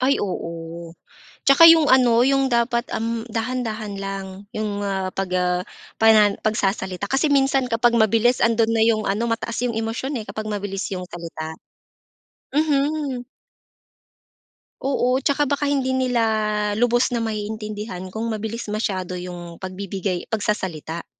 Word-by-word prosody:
Ay, 265 +2 +2
oo. 170 -3 -5 0.5
Tsaka 275 +4 +8
'yong 325 -2 +7
ano, 245 -2 +5
'yong 270 0 +3
dapat, 235 0 +1
uhm, 230 +1 -2
dahan-dahan 225 -2 -3
lang, 195 0 -4 0.3
'yong, 210 -1 -2
ah, 195 -2 -2
pag, 195 -1 -3
ah, 180 0 +1 0.4
pana 215 -2 +6
pagsasalita. 195 -3 -1
Kasi 275 +3 +2
minsan 270 -2 +2
kapag 235 0 +3
mabilis, 230 +2 +3
andoon 230 -1 +3
na 225 - +1
'yong 220 -2 +2
ano, 210 +4 0
mataas 230 0 -2
'yong 235 -2 -1
emosyon, 225 +5 -2
eh, 220 - -4
kapag 215 0 -6
mabilis 200 -2 -3
'yong 180 -1 -4
salita. 165 -2 -6 1.0
Mhm. 290 -3 0 1.6
Oo. 255 -2 +2
Tsaka 285 0 +2
baka 285 0 0
hindi 270 -2 +1
nila 250 -3 +1 0.5
lubos 240 +2 +3
na 240 -2 -2
maiintindihan 210 -3 -5
kung 225 +1 -3
mabilis 220 +1 -4
masyado 190 -4 -2
'yong 175 -1 -7
pagbibigay 190 -1 -4
pagsasalita. 190 -7 -3
220 Hz, 135 wpm, -22 LUFS, 195-250 Hz, 1.6 s, Tsaka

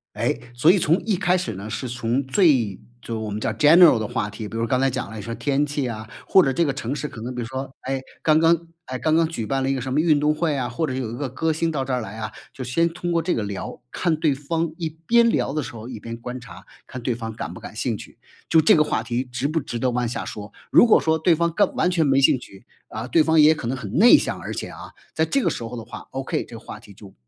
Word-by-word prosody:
诶， - - -1
所 140 +8 +4
以 195 - +3
从 165 +2 +3
一 210 -4 +1
开 180 0 +2
始 120 -10 -3
呢 100 +3 -7
是 125 +3 -4
从 120 +3 -1
最 130 - +2 0.2
就 115 -1 -5
我 110 -1 -4
们 105 +1 -4
叫 110 - -1
general 150 +2 +7
的 110 - -2
话 115 -4 -2
题， 105 0 -7
比 115 - -7
如 115 0 0
刚 130 +2 +1
才 135 0 +3
讲 130 0 -4
了， 110 - -10
你 105 - -6
说 115 - -6
天 145 0 +1
气 145 -3 -2
啊， 110 -1 -6 0.2
或 190 - +6
者 135 - +1
这 170 - +2
个 145 - 0
城 135 0 -3
市 150 - -3
可 115 - -9
能 125 +2 -4
比 125 - -4
如 115 - -4
说， 130 +2 -5
哎， 135 0 -2 0.2
刚 155 0 +4
刚 165 0 +3 0.2
哎， 130 0 -4
刚 155 -1 +1
刚 165 +1 +4
举 115 -10 -4
办 135 +4 -1
了 135 - 0
一 - - +2
个 130 - -3
什 130 +1 -4
么 150 - +2
运 155 -2 +4
动 150 +1 +2
会 160 -2 0
啊， 125 -2 -2
或 165 - -3
者 130 - -3
有 125 -4 -3
一 120 - -5
个 140 -1 -3
歌 160 +5 0
星 165 +1 0
到 135 -4 -2
这 130 - -3
儿 125 - 0
来 110 -1 -7
啊， 110 - -4 0.2
就 130 - -8
先 165 +7 +1
通 175 +1 -4
过 165 -1 +1
这 175 +2 0
个 110 - -1
聊， 100 -1 -6
看 170 -3 0
对 155 -3 +2
方， 160 +3 -2
一 165 -2 -2
边 230 +10 +3
聊 135 - 0
的 155 - 0
时 - - -7
候 115 +2 -8
一 120 -4 -7
边 115 +2 -6
观 125 +2 -6
察， 125 - -13 0.2
看 130 - -7
对 120 0 -1
方 115 -1 -6
感 110 - -6
不 - - -10
感 - - -9
兴 - - -1
趣， - - -13 0.3
就 165 - +5
这 160 - +5
个 155 - +5
话 - - -1
题 120 0 -1
值 125 +1 -3
不 155 +2 0
值 120 -3 -5
得 125 +2 +1
往 120 0 0
下 120 - -4
说。 105 0 -8 0.2
如 - - +7
果 - - +6
说 160 0 +2
对 170 0 +4
方 170 0 0
根 205 - +2
完 - - +2
全 175 -3 +2
没 135 -1 +3
兴 135 - +5
趣， 95 -5 -14 0.2
啊， 110 +3 -5
对 155 +6 +4
方 160 0 +4
也 155 +1 +7
可 140 -6 -6
能 130 - -1
很 105 -6 -7
内 225 +8 +8
向， - - -3
而 - - -6
且 - - -4
啊， - - -10 0.2
在 160 - +2
这 275 +11 +1
个 - - +2
时 - - -5
候 115 +2 -6
的 115 - -7
话 - - -9
，OK， 135 0 -3
这 115 - -11
个 - - -10
话 - - -9
题 100 - -15
就 100 0 -14
135 Hz, 335 characters per minute, -23 LUFS, 115-160 Hz, 0.3 s, 内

